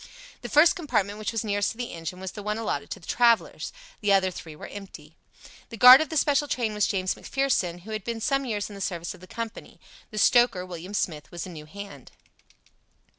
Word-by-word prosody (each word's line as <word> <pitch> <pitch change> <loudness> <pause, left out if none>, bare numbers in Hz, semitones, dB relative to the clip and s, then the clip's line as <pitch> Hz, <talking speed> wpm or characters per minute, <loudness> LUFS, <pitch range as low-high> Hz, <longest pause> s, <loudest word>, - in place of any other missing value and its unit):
The - - -6
first 315 +5 +6
compartment, 210 - -1
which 215 - -2
was 225 -1 -2
nearest 205 -1 0
to - - -20
the 245 -1 -4
engine, 165 +2 -6
was 190 0 -5
the 210 - -8
one 210 +1 -2
allotted 225 - -3
to - - -6
the 165 - -16
travellers. 235 -1 +2 0.3
The 205 -1 +1
other 190 -1 +4
three 160 -3 -9
were - - -9
empty. 165 -6 -10 0.5
The 230 - -8
guard 250 +5 +10
of 315 - -2
the 315 - -2
special 290 0 +2
train 235 -6 -1
was 210 0 +1
James 185 -2 0
McPherson, 190 -11 -1
who 215 +5 -10
had 215 -2 -4
been 230 +1 -4
some 275 +4 +1
years 210 -5 -2
in 210 - -11
the 200 - -9
service 170 -3 -3
of 185 - -16
the 185 - -12
company. 230 +2 -7 0.3
The 215 - -9
stoker, 225 -4 +4
William 180 +2 -7
Smith, 155 -7 -2
was 170 -1 -6
a 185 - -8
new 155 -2 -10
hand. 200 +4 -10
205 Hz, 225 wpm, -26 LUFS, 185-235 Hz, 0.5 s, guard